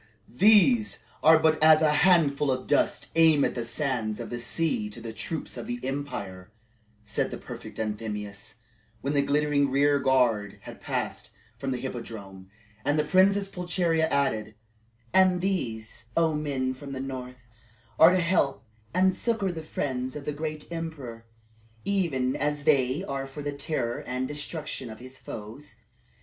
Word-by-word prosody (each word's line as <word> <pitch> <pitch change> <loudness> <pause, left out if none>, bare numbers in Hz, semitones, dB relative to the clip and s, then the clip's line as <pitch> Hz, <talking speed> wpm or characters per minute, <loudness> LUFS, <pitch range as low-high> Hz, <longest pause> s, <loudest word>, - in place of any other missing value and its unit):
"These 215 - +4 0.2
are 160 +1 +7
but 155 -1 +2
as 155 0 +7
a 155 - +5
handful 150 -4 +4
of 130 -1 -1
dust - - +1
amid 160 -3 +5
the 120 - -3
sands 120 -3 -1
of - - -6
the 120 - -3
sea 120 -3 -1
to 105 - -9
the 115 -1 -7
troops 160 +7 -4
of - - -6
the 245 0 -3
empire," 100 -9 -5 0.5
said 105 - -1
the - - -6
prefect - - -9
Anthemius, 105 -2 -5 0.5
when 140 +4 -1
the 140 - +3
glittering 145 0 +2
rear 140 +1 +3
guard 125 -7 +2
had - - -11
passed - - -3 0.2
from 135 - -4
the 130 - -1
Hippodrome. 105 -7 -7 0.3
And 145 - +1
the 150 - +3
Princess 195 +5 +3
Pulcheria 175 -3 0
added, 110 -6 0 0.6
"And 185 -1 +5
these, 115 - -3
O 165 -1 +3
men 140 -4 -1
from 140 +1 -9
the 130 - -4
north, 125 -2 -6 0.6
are 160 - +10
to 185 0 +2
help 170 -8 +1 0.3
and 185 0 +4
succor 220 -5 0
the 165 -2 -6
friends 130 -4 -3
of 145 -1 -7
the 150 - -2
great 155 +1 -5
emperor, 140 -9 -6 0.6
even 155 -11 0
as 150 0 -1
they 140 +1 +2
are 135 -6 -4
for 145 +2 -8
the 145 0 -3
terror 140 -4 -2
and 130 +1 -2
destruction 150 -2 -5
of 110 - -8
his 130 +2 -12
foes. 110 +4 -9
140 Hz, 160 wpm, -27 LUFS, 125-160 Hz, 0.6 s, are